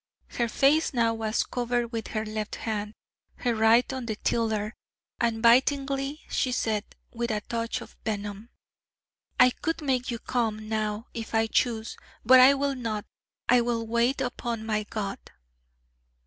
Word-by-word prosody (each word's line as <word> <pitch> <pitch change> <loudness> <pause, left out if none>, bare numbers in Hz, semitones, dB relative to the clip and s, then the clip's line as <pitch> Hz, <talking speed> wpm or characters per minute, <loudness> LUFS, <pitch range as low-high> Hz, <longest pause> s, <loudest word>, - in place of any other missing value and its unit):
Her 235 - -1
face 285 +5 +3
now 230 -1 +3
was 220 -1 0
covered 240 -1 -2
with 225 -2 -4
her 215 0 -3
left 215 -1 -4
hand, 210 -1 -4 0.4
her 245 -2 0
right 225 +4 +4
on 260 -3 -5
the 220 - -2
tiller: 215 -1 -1 0.5
and 230 -1 0
bitingly 275 +4 +3
she 255 - 0
said, 220 -4 0 0.3
with 235 0 -2
a 210 -2 -1
touch 230 +1 -3
of - - -12
venom: 205 +1 -4 0.9
'I 250 0 +7
could 325 0 -2
make 255 -3 0
you 235 - -2
come 220 -3 -2
now, 215 0 -2
if 225 -1 -5
I 225 0 +4
chose: 225 0 0 0.3
but 255 +2 +8
I 265 +2 +8
will 280 0 0
not: 225 -5 -3 0.4
I 245 0 +5
will 235 -1 -1
wait 235 +4 +1
upon 240 -3 -3
my 215 -1 0
God....' 205 -2 -4
230 Hz, 155 wpm, -27 LUFS, 220-250 Hz, 0.9 s, but